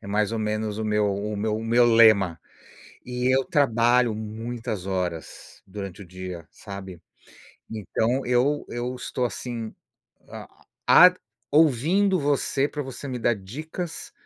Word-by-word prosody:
é - - -12
mais 105 +2 0
ou 115 - -2
menos 110 0 -2
o 110 - -2
meu 105 -2 +1
o 105 +1 -4
meu 105 +1 -1
o 110 - -5
meu 120 +2 +4
lema. 110 -8 +5 0.6
E 125 0 -2
eu 135 - +2
trabalho 120 -3 +3
muitas 110 -1 -5
horas 90 -4 -5
durante 100 0 -8
o - - -14
dia, 90 -2 -8
sabe. 95 -4 -9 0.7
Então 110 +4 -1
eu 125 +4 +1
eu 120 +1 -3
estou 125 0 -4
assim, 120 -2 -5 0.5
ah, - - -12 0.2
a 180 +1 +8 0.4
ouvindo 165 - +3
você, 140 -1 +1
pra 150 0 -5
você 135 +1 -7
me 125 -2 -4
dar 120 0 +2
dicas 155 - -7
115 Hz, 145 wpm, -25 LUFS, 100-125 Hz, 0.7 s, a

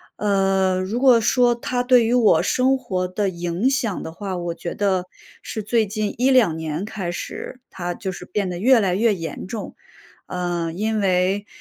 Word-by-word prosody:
呃， 195 -2 +1
如 200 +6 -2
果 250 -3 +5
说 245 +2 +3
它 245 +1 -2
对 250 -1 +5
于 240 - +2
我 235 -4 +4
生 260 +1 +2
活 190 -9 -2
的 195 +2 -1
影 175 +6 -1
响 250 -7 -1
的 160 - -6
话， 190 +3 -5
我 175 -1 -4
觉 170 - -5
得 190 -3 0 0.4
是 220 - -5
最 220 +1 +1
近 210 0 -3
1-2 250 -9 +3
年 160 +2 -3
开 195 -5 -4
始 255 +7 -7
它 175 -1 -4
就 190 0 -5
是 180 - -9
变 195 0 -2
得 175 - -4
越 245 +6 +5
来 190 -4 +1
越 220 +2 +3
严 165 -5 -6
重。 215 +2 -6 0.5
呃， 175 -2 -2
因 215 +4 -1
为， 190 +1 +1
200 Hz, 190 characters per minute, -22 LUFS, 180-230 Hz, 0.5 s, 果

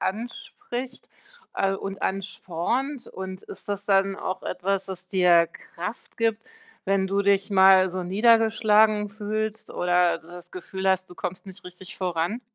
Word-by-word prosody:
anspricht, 245 - -5 0.5
äh, 195 0 +1
und 195 0 -6
anspornt, 195 - -2
und 190 0 -7
ist 190 - -11
das 200 0 -3
dann 195 -1 +3
auch 185 0 -4
etwas, 190 +1 -1
das 185 -1 -8
dir 175 -3 +5
Kraft 180 +5 -8
gibt, 225 -1 +1 0.4
wenn 195 -1 +1
du 200 +1 +1
dich 200 0 +2
mal 190 -1 +6
so 185 0 -4
niedergeschlagen 215 +1 +4
fühlst 215 +1 -4
oder 180 0 +2
das 175 +1 -13
Gefühl 190 +1 -3
hast, 190 -1 +1
du 180 - -12
kommst 180 +1 -5
nicht 190 +1 -12
richtig 180 +1 -10
voran? 180 +4 -1
195 Hz, 145 wpm, -25 LUFS, 185-210 Hz, 0.5 s, mal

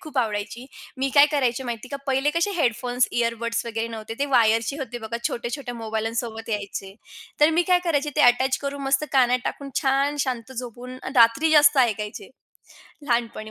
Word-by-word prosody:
खूप 300 -3 -5
आवडायची. 225 +2 -2 0.3
मी 270 +1 0
काय 285 0 +8
करायची 265 -3 0
माहिती 240 0 -6
का, 280 - -4
पहिले 270 +2 +1
कसे 335 +6 0
हेडफोन्स, 245 -3 +1
इयरबड्स 235 0 -1
वगैरे 225 0 -3
नव्हते 225 0 -7
ते 285 - 0
वायरचे 230 0 +2
होते 245 -3 -5
बघा 225 +1 -5
छोट्या-छोट्या 245 +1 -5
मोबाईल्ससोबत 225 0 -4
यायचे, 200 -2 -4 0.5
तर 300 +2 +6
मी 335 +2 +2
काय 360 -1 +5
करायचे 295 -3 0
ते - - +3
अटॅच 255 +1 +4
करून 280 0 -5
मस्त 275 +2 +1
कानात 250 -2 +4
टाकून 280 -1 -5
छान 275 +2 +1
शांत 255 -1 -4
झोपून 250 +1 -8 0.2
रात्री 245 +6 +5
जास्त 295 -2 +6
ऐकायचे. 215 -4 -1 0.7
लहानपणी 235 -4 -2
245 Hz, 165 wpm, -24 LUFS, 230-275 Hz, 0.7 s, काय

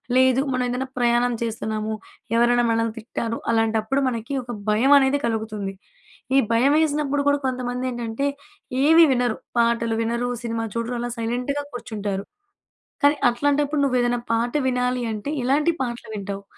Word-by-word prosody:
లేదు 260 0 +4
మనం 255 0 0
ఏదైనా 250 +2 -2
ప్రయాణం 240 0 +2
చేస్తున్నాము. 220 -1 -2 0.4
ఎవరైనా 240 +1 +4
మనల్ని 230 0 0
తిట్టారు. 230 0 -4
అలాంటప్పుడు 225 +2 +1
మనకి 235 +1 -3
ఒక 240 - -7 0.2
భయం 225 +6 +3
అనేది 275 +1 +3
కలుగుతుంది. 215 -3 -3 0.6
ఈ - - +7
భయం 250 +5 +4
వేసినప్పుడు 295 -2 +1
కూడా 285 0 +4
కొంతమంది 250 -1 -2
ఏంటంటే 240 +1 -3 0.6
ఏమి 325 +3 +7
వినరు. 245 -3 +1 0.2
పాటలు 235 -1 +2
వినరు, 235 +2 -1
సినిమా 230 -1 -2
చూడరు 230 +1 -2
అలా 240 0 -3
సైలెంట్‌గా 245 +5 -2
కూర్చుంటారు. 205 -5 -4 0.8
కానీ 290 +1 +6
అట్లాంటప్పుడు 285 +4 +1
నువ్వు 260 -2 +2
ఏదైనా 245 0 +1
పాట 230 +1 0
వినాలి 250 0 0
అంటే, 215 +6 -4
ఎలాంటి 295 +6 +2
పాటలు 240 -3 -4
వింటావు? 200 -1 -5
240 Hz, 140 wpm, -23 LUFS, 225-260 Hz, 0.8 s, ఈ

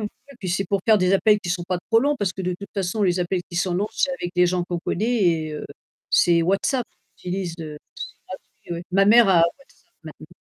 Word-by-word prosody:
Ouais, 210 - -2 0.3
puis 185 - -5
c'est 190 +2 -1
pour 200 +1 0
faire 220 -2 +5
des 185 +1 +2
appels 210 +1 +4
qui 175 - -7
sont 175 0 -1
pas 180 -1 -2
trop 225 - +5
longs 290 +3 +1
parce 195 -3 -1
que 190 - -6
de 180 0 -1
toute 200 -1 -9
façon, 195 +2 -1
les 180 -2 +2
appels 180 +1 -1
qui 175 - -7
sont 180 0 0
longs 200 +3 0
c'est 275 - 0
avec 175 -9 -5
des 180 0 +4
gens 180 0 0
qu'on 175 -1 -3
connaît, 225 +6 -1
et, 160 -3 +1
heu, 150 - -6 0.5
c'est 170 -1 +4
WhatsApp, 205 +7 0 0.3
qui 180 - -10
utilises, 180 -2 -3
heu, 155 -1 -6
WhatsApp, 150 - -9 0.2
c'est - - -14 0.7
gratuit, 170 - -2
ouais. 170 - -6
Ma 195 +2 +4
mère 230 +2 +7
a 175 -3 +5
WhatsApp, 275 +11 -5 0.2
maintenant. - - -11
185 Hz, 255 wpm, -23 LUFS, 175-205 Hz, 0.7 s, mère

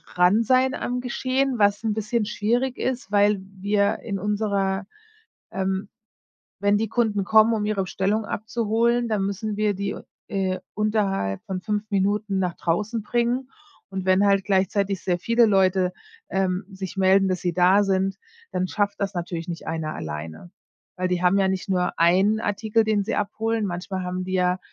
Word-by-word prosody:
dran 180 +6 +4
sein 260 +3 +3
am 245 0 -3
Geschehen, 255 +1 0
was 205 +2 +3
'n 220 -2 0
bisschen 220 +1 -1
schwierig 240 +5 0
ist, 250 -6 -3
weil 205 0 +4
wir 200 +1 0
in 200 -3 -4
unserer, 200 -1 -1 0.7
ähm 190 +1 -2 0.7
wenn 205 0 +3
die 220 -1 -1
Kunden 220 -4 +1
kommen, 220 +2 +5
um 210 -2 0
ihre 205 -2 0
Bestellung 200 +4 -1
abzuholen, 230 +3 0
dann 205 -3 0
müssen 205 +2 -3
wir 210 -1 +2
die, 200 +1 -3 0.3
äh, 190 -2 -1 0.2
unterhalb 200 - 0
von 185 -1 -4
5 210 0 -1
Minuten 200 +1 0
nach 180 -2 -1
draußen 210 +7 -1
bringen. 240 +3 0 0.4
Und 190 -1 -4
wenn 190 +2 +4
halt 195 -1 +3
gleichzeitig 195 0 +1
sehr 180 -2 0
viele 230 +3 +3
Leute, 185 -2 +2 0.4
ähm, 190 -1 0
sich 190 0 -7
melden, 190 +1 +4
dass 185 - -1
sie 175 -1 -1
da 185 +4 +5
sind, 195 0 0 0.3
dann 185 0 -1
schafft 205 0 -1
das 200 0 -1
natürlich 170 -1 -4
nicht 170 - -6
einer 160 -1 -3
alleine. 80 - -7 0.5
Weil 185 0 0
die 180 0 -1
haben 180 +2 +4
ja 190 - +3
nicht 190 +1 -3
nur 180 -1 0
1 190 +6 +4
Artikel, 215 +2 +1
den 210 -2 +1
sie - - -1
abholen, 220 +1 -1
manchmal 185 +1 -4
haben 180 0 -3
wir, 185 0 +1
200 Hz, 165 wpm, -24 LUFS, 185-215 Hz, 0.7 s, kommen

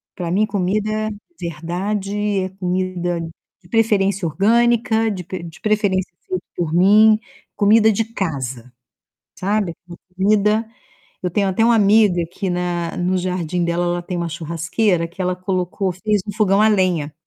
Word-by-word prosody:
Pra 175 -2 -4
mim, 205 +4 +3
comida 215 +2 -1 0.3
verdade 195 +5 -2
é 185 0 -2
comida 180 -2 -2 0.4
de 175 - -21
preferência 200 -4 +2
orgânica, 225 +4 +2
de 185 -3 -5
pre 180 0 -6
de 165 -2 -10
preferência 205 -4 0
feita 185 -1 -3
por 165 -3 -2
mim. 210 +5 +6 0.4
Comida 215 +1 +5
de 220 +2 0
casa, 135 - -4 0.7
sabe? 195 -2 0 0.4
Comida 210 +3 +2 0.6
eu 180 - -1
tenho 200 +3 +1
até 190 +4 +1
uma 235 0 +5
amiga 205 -4 +4
que 195 +2 -4
na 175 -1 -2
no 180 +1 0
jardim 180 -1 -2
dela, 170 +1 0
ela 175 0 -1
tem 180 +1 -5
uma 170 0 -2
churrasqueira 165 +3 -1
que 175 +3 -14
ela 180 0 0
colocou 185 +1 -2
fez 205 +3 0
um 205 - -4
fogão 200 -1 +2
a 215 - +5
lenha. 180 -8 +1
190 Hz, 150 wpm, -20 LUFS, 175-210 Hz, 0.7 s, mim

